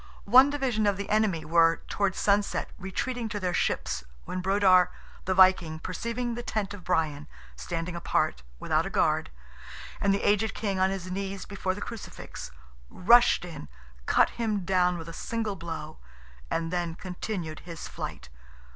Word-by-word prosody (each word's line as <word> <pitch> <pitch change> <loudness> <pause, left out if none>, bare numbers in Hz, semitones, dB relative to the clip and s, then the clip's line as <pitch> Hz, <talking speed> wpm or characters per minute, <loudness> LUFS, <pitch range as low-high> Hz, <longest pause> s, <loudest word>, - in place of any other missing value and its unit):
One 255 +6 +7
division 255 -7 0
of 200 -2 +2
the 200 0 -5
enemy 205 -7 +2
were, 165 +1 +3
towards 200 -2 0
sunset, 200 0 +1
retreating 230 +5 -3
to 210 -1 -3
their 180 -2 -1
ships, 65 - -1 0.2
when 185 - -4
Brodar, 185 -2 +5 0.4
the 190 - 0
Viking, 185 -4 +5
perceiving 235 +8 -3
the 240 - -4
tent 210 -4 -2
of 200 -3 -10
Brian, 150 -3 0 0.3
standing 170 0 -4
apart, 115 - 0 0.2
without - - +1
a - - -4
guard, - - +1 0.7
and 200 - +2
the 200 - 0
aged 210 +1 +2
king 200 -3 -2
on 190 0 +4
his 185 -1 -4
knees 195 0 -4
before 190 -1 -3
the - - -8
Crucifix, 225 - -8 0.4
rushed 235 +1 +5
in, 160 - -9 0.4
cut - - +4
him 215 -5 -2
down 180 -1 +2
with 165 -1 -8
a 165 - -7
single 220 +2 -3
blow, 160 -3 -7 0.5
and 165 +1 -2
then 175 -2 -1
continued 180 -3 -5
his 170 -2 -8
flight. - - -7
190 Hz, 160 wpm, -28 LUFS, 170-210 Hz, 0.7 s, One